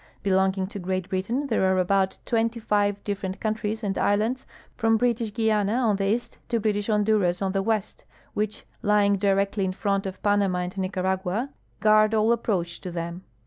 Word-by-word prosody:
Belonging 190 0 +2
to 200 +1 -7
(treat 185 0 -3
Britain 225 +10 -1
there 230 -7 0
are 190 - +2
about 190 +1 +1
twenty 230 0 0
five 205 -2 +1
ditferent 195 -2 -4
countries 220 0 -2
and 195 -2 -1
islands, 220 +6 +1 0.3
from 225 -1 +2
British 230 -2 0
Guiana 215 -2 +1
on 230 -5 +2
the 195 0 0
east 240 - -8
to 230 - +1
British 205 -1 0
Honduras 210 -4 +2
on 190 -1 -1
tlie 195 0 0
ivest, 215 -1 -2 0.3
which 210 +1 -3 0.2
lying 205 -1 +3
directly 195 +1 +1
in 185 -1 -1
front 195 0 -1
of 190 - -7
Panama 205 -3 +2
and 180 +1 -5
Nicaragua 190 +5 -1 0.3
guard 215 +1 +5
all 220 +2 +4
ajiproach 180 -7 -2
to 185 - -6
them. 170 +1 -5
205 Hz, 175 wpm, -25 LUFS, 190-220 Hz, 0.3 s, guard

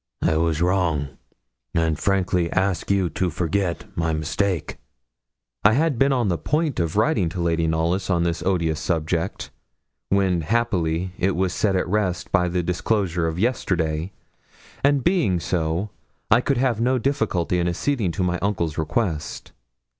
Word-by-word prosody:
I 80 - +2
was 80 0 +1
wrong, 85 -6 +1 0.7
and 80 -2 +1
frankly 90 -3 +1
ask 95 -1 0
you 100 -2 +2
to 90 - 0
forget 85 +2 -1
my 80 -1 0
mistake.' 85 +3 -1 0.9
I 105 - +6
had 145 -1 +1
been 135 +1 +4
on 125 -5 +1
the 85 -3 0
point 150 -2 0
of 85 0 -1
writing 105 - +2
to 90 - -6
Lady 85 -1 +1
Knollys 85 +5 0
on 85 -2 +2
this 85 0 -1
odious 85 -4 0
subject, 85 +2 -2 0.6
when, 95 -3 +2
happily, 90 -3 0
it 95 0 +1
was 90 0 0
set 100 0 +1
at 90 - 0
rest 95 -2 -1
by 90 -2 +3
the 90 0 -1
disclosure 90 -1 0
of 80 0 -3
yesterday; 90 -7 0 0.7
and 140 -2 +3
being 165 - +2
so, 85 +3 -1 0.4
I 115 +3 +6
could 140 0 0
have 120 -3 +1
no 130 +2 +2
difficulty 110 - 0
in 85 - +1
acceding 100 +2 0
to 95 - -1
my 90 -1 0
uncle's 85 -6 -1
request. 80 -2 -2
90 Hz, 155 wpm, -23 LUFS, 85-105 Hz, 0.9 s, I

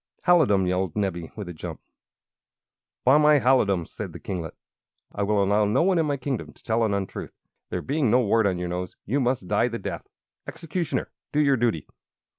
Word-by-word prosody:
"Halidom!" 135 - +4
yelled 90 -1 -1
Nebbie, 95 -5 -2
with 105 -4 -6
a 90 - -6
jump. 80 - -7 1.3
"By 135 +4 +6
my 150 0 +6
halidom!" 105 -9 +3
said - - -7
the - - -8
kinglet, 85 -4 -5 0.6
"I - - -4
will 100 0 +2
allow 100 +2 +3
no 105 +9 +2
one 185 -1 +3
in 160 - +1
my 145 -1 0
kingdom 130 -2 -4
to - - -22
tell 115 0 +1
an 105 -2 +1
untruth. 100 -1 -5 0.3
There - - -3
being 140 -3 +1
no 125 +4 +5
wart 110 -1 +3
on 95 -2 0
your 90 0 -3
nose, 90 0 -4
you 135 +8 0
must 125 -7 0
die 115 - +2
the 115 -1 -4
death! 100 - -6 0.4
Executioner, 165 +1 -3 0.2
do 150 - +1
your 140 -2 +4
duty!" 115 - 0
110 Hz, 195 wpm, -25 LUFS, 95-140 Hz, 1.3 s, By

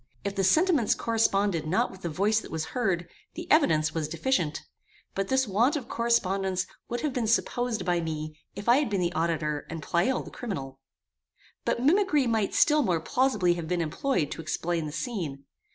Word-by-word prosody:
If 200 0 -3
the 195 - 0
sentiments 310 - +3
corresponded 200 -7 +1
not 180 +4 +1
with 190 - -13
the 170 - -3
voice 205 +7 +2
that - - -10
was 160 -1 -3
heard, 190 -8 0 0.3
the 345 +2 -6
evidence 155 - +4
was 160 -2 -1
deficient; 165 - -1 0.5
but 195 0 -2
this 265 -1 +2
want 230 - +2
of 275 -6 -4
correspondence 195 -5 0 0.2
would 240 - -2
have 300 -3 -1
been 245 -4 -1
supposed 235 +1 0
by 175 -2 +1
me 155 -1 -4 0.2
if 200 +3 -7
I 240 +2 +6
had 290 -4 +1
been 200 -2 0
the 175 0 0
auditor 155 -2 -1
and 160 -2 -6
Pleyel 180 +10 +1
the - - -10
criminal. 135 - -6 0.9
But 240 - 0
mimicry 310 -2 +3
might 220 -4 0
still 300 -1 +5
more 180 - +1
plausibly 210 -2 +2
have 170 -2 -5
been 180 +1 0
employed 165 - -1
to - - -5
explain 165 +1 -2
the - - -6
scene. 155 - -4
195 Hz, 185 wpm, -27 LUFS, 165-245 Hz, 0.9 s, I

